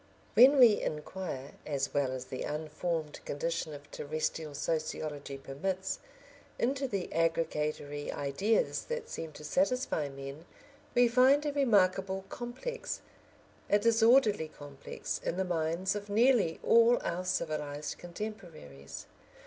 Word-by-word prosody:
When 255 Hz, +6 st, +8 dB
we 235 Hz, -5 st, +7 dB
inquire, 150 Hz, -3 st, -4 dB
as 140 Hz, -2 st, -2 dB
well 140 Hz, -3 st, +1 dB
as 130 Hz, -1 st, -5 dB
the 130 Hz, -, -6 dB
unformed 155 Hz, +1 st, -3 dB
condition 165 Hz, +2 st, -2 dB
of 145 Hz, 0 st, -13 dB
terrestrial 155 Hz, 0 st, -3 dB
sociology 150 Hz, -2 st, -3 dB
permits, 185 Hz, +8 st, -3 dB, 0.6 s
into 270 Hz, +3 st, 0 dB
the 200 Hz, -6 st, -3 dB
aggregatory 155 Hz, -3 st, -1 dB
ideas 145 Hz, +11 st, 0 dB
that 475 Hz, 0 st, -4 dB
seem 160 Hz, -1 st, -5 dB
to 150 Hz, -, -11 dB
satisfy 250 Hz, -, 0 dB
men, 135 Hz, +3 st, -8 dB, 0.5 s
we 245 Hz, 0 st, +6 dB
find 260 Hz, +5 st, +5 dB
a 295 Hz, -, 0 dB
remarkable 195 Hz, -7 st, +2 dB
complex, 475 Hz, -, -5 dB, 0.7 s
a 205 Hz, -, +6 dB
disorderly 225 Hz, -4 st, +4 dB
complex, 145 Hz, -2 st, -6 dB
in 170 Hz, -, -2 dB
the 190 Hz, -, +1 dB
minds 170 Hz, +2 st, 0 dB
of 205 Hz, 0 st, -6 dB
nearly 215 Hz, -5 st, +3 dB
all 235 Hz, +1 st, +6 dB
our 175 Hz, +2 st, -2 dB
civilised 150 Hz, -4 st, -2 dB
contemporaries. 170 Hz, -, -8 dB
170 Hz, 120 wpm, -31 LUFS, 150-225 Hz, 0.7 s, When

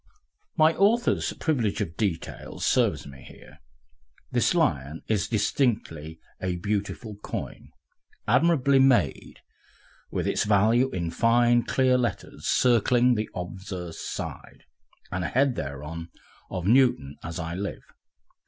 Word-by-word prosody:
My 155 Hz, 0 st, +5 dB
author's 225 Hz, +6 st, +2 dB
privilege 125 Hz, -10 st, -1 dB
of 80 Hz, -, -3 dB
details 95 Hz, -7 st, -3 dB
serves -, -, +2 dB
me 70 Hz, -1 st, -12 dB
here. -, -, -15 dB, 0.7 s
This -, -, +2 dB
Lion 70 Hz, +4 st, 0 dB
is 105 Hz, -3 st, 0 dB
distinctly 100 Hz, -, -1 dB, 0.2 s
a 90 Hz, -1 st, -1 dB
beautiful 105 Hz, +3 st, -3 dB
coin, -, -, -7 dB, 0.6 s
admirably 140 Hz, -5 st, +4 dB
made, 130 Hz, -2 st, +2 dB, 0.7 s
with -, -, -2 dB
its -, -, +1 dB
value 110 Hz, +5 st, +3 dB
in 85 Hz, -7 st, -3 dB
fine, 120 Hz, +4 st, +3 dB
clear 130 Hz, +2 st, +2 dB
letters 120 Hz, -, -3 dB
circling 125 Hz, 0 st, +3 dB
the 110 Hz, -2 st, -2 dB
obverse 90 Hz, -1 st, -6 dB
side, -, -, -7 dB, 0.5 s
and 90 Hz, 0 st, -2 dB
a -, -, -1 dB
head 135 Hz, +1 st, +2 dB
thereon 80 Hz, -, -6 dB, 0.4 s
of 90 Hz, -2 st, -4 dB
Newton, 105 Hz, -, +3 dB
as 85 Hz, 0 st, -5 dB
I 80 Hz, +1 st, -4 dB
live! 100 Hz, +3 st, -5 dB
105 Hz, 120 wpm, -26 LUFS, 85-125 Hz, 0.7 s, My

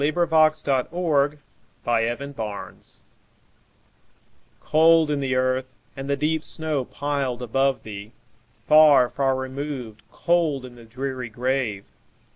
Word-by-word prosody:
Emily 150 Hz, +2 st, +1 dB
Brontë 155 Hz, -2 st, +2 dB, 0.5 s
Remembrance 120 Hz, -1 st, -3 dB, 1.6 s
COLD 160 Hz, 0 st, +4 dB
in 145 Hz, -, 0 dB
the 135 Hz, -2 st, -1 dB
earth, 130 Hz, 0 st, 0 dB, 0.3 s
and 135 Hz, +1 st, -6 dB
the 140 Hz, -, +1 dB
deep 155 Hz, +2 st, 0 dB
snow 155 Hz, -6 st, -3 dB
piled 135 Hz, -4 st, -3 dB
above 135 Hz, +3 st, 0 dB
thee! 105 Hz, 0 st, -8 dB, 0.6 s
Far, 150 Hz, -5 st, +7 dB
far 135 Hz, -1 st, +1 dB
removed, 130 Hz, -4 st, -5 dB
cold 160 Hz, -6 st, 0 dB
in 125 Hz, -, -11 dB
the 120 Hz, -1 st, -14 dB
dreary 130 Hz, +1 st, -5 dB
grave! 120 Hz, -3 st, -2 dB
135 Hz, 105 wpm, -23 LUFS, 125-150 Hz, 1.6 s, Far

